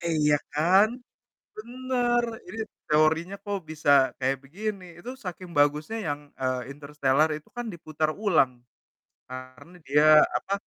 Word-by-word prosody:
Iya, 155 -3 +2 0.2
kan? 185 +8 +4 0.7
Benar, 240 +1 -1 0.2
ini 225 - -8 0.3
teorinya, 160 +5 +2
kok, 205 -1 -2
bisa 155 -2 0 0.3
kayak 135 +1 0
begini. 195 +6 -5
Itu 240 +8 -8
saking 180 0 -7
bagusnya 150 +9 +2
yang, 145 0 -2 0.2
eee, 130 0 -2
Interstellar 145 +1 +1
itu 150 - -13
kan 240 -1 -4
diputar 155 -2 -2
ulang, 155 -10 +4 0.8
karena 130 +6 -10
dia, 150 +2 +4 0.3
apa, 195 - -5
155 Hz, 125 wpm, -26 LUFS, 145-200 Hz, 0.8 s, kan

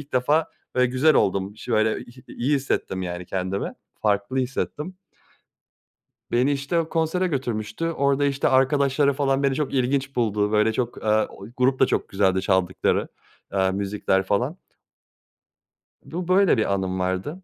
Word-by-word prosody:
ilk 145 0 -13
defa 150 +6 +2 0.3
böyle, 125 0 +4
güzel 130 +6 +3
oldum 95 +1 +1
iş 110 - -13
böyle 110 0 +2
iy 120 - -16
iyi 135 +5 0
hissettim, 115 -8 -2
yani, 90 0 -5
kendimi, 95 +1 -3 0.3
farklı 105 +4 0
hissettim. 150 +7 -3 1.4
Beni, 125 +4 +3
işte, 140 +5 0
o 160 - -2
konsere 165 +3 0
götürmüştü. 120 -2 -3
Orada, 140 -1 +1
işte, 140 0 +1
arkadaşları 140 +1 +3
falan, 135 0 +1
beni 135 -1 +2
çok 145 -1 -2
ilginç 135 +1 0
buldu, 105 -3 +1
böyle, 110 +1 +3
çok, 120 0 -3
aaa, 110 0 +2
o - - -11
grup 130 +1 +2
da 130 - +6
çok - - -1
güzeldi 95 -1 +2
çaldıkları, 95 -1 +1 0.4
aaa, 95 -1 +2
müzikler 95 -1 0
falan. 125 - -1 1.5
Bu, 175 +1 -5
böyle 185 - +4
bir 105 -2 +1
anım 95 -1 -2
vardı. 95 - -3
125 Hz, 150 wpm, -24 LUFS, 100-140 Hz, 1.5 s, da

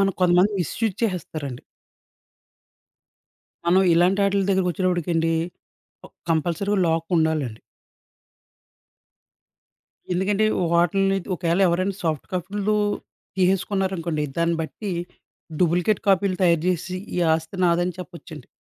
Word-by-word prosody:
మనం 195 -1 +2
కొంతమంది 180 +3 +4
మిస్‌యూస్ 200 +5 -2
చేసేస్తారండి. 155 - -3 2.0
మనం 185 +2 +5
ఇలాంటాటిల 195 +3 +3
దగ్గరకొచ్చేటప్పటికండి 175 -3 +1 0.7
క్ - - -20 0.2
కంపల్సరీగా 175 +6 0
లాక్ 165 0 0
ఉండాలండి. 155 -8 0 2.5
ఎందుకంటే, 195 +4 +1 0.3
వాటిల్ని 195 +3 +3
ది - - -14
ఒకేళ 170 +1 0
ఎవరైనా 185 +3 0
సాఫ్ట్ 155 -4 -2
కాపీలు 200 +4 -1 0.6
తీసేసుకున్నారనుకోండి, 185 -4 0
దాన్ని 170 0 +1
బట్టి 195 +4 -5 0.7
డూప్లికేట్ 180 +4 +2
కాపీలు 195 -1 +3
తయారు 170 -3 +3
జేసి 180 +1 -1 0.2
ఈ - - 0 0.2
ఆస్తి 160 +4 -5
నాదని 175 0 +2
చెప్పొచ్చండి. 170 -6 -10
180 Hz, 95 wpm, -23 LUFS, 165-195 Hz, 2.5 s, మనం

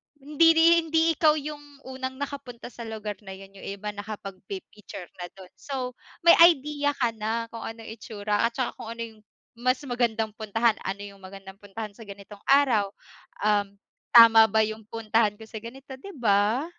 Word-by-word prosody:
hindi 295 +3 +2
ri 325 - +5 0.2
hindi 320 0 +2
ikaw 310 -1 +4
yung 300 0 -6 0.2
unang 260 0 -6
nakapunta 265 -4 -7
sa 235 -1 -9
lugar 215 -2 -6
na 190 -1 -9
yun, 195 0 -13
yung 195 - -11
iba 200 +1 -5
nakapagpi-picture 200 -2 -9
na 175 - -5
dun. 185 -1 -14
So, 260 -3 -4 0.3
may 340 - +8
idea 290 -3 +4
ka 240 -4 0
na 225 +1 -3
kung 230 - -8
anong 225 -1 -8
itsura 210 -1 -1
at 235 - -10
tsaka 255 - -1
kung 230 -1 -7
ano 230 - -7
yung 220 -2 -11 0.3
mas 255 +2 0
magandang 225 -3 0
puntahan. 225 0 +1
Ano 195 +1 -4
yung 200 -1 -11
magandang 195 0 -11
puntahan 210 +1 -7
sa 225 - -12
ganitong 200 0 -11
araw, 250 -8 +4 0.5
um, 205 -1 +1 0.4
tama 225 -1 +9
ba 220 +1 +2
yung 220 +1 -4
puntahan 220 -1 0
ko - - -10
sa 220 0 -7
ganito, 265 +3 -10
'di 395 - -10
ba? 215 +4 +2
225 Hz, 175 wpm, -26 LUFS, 205-255 Hz, 0.5 s, tama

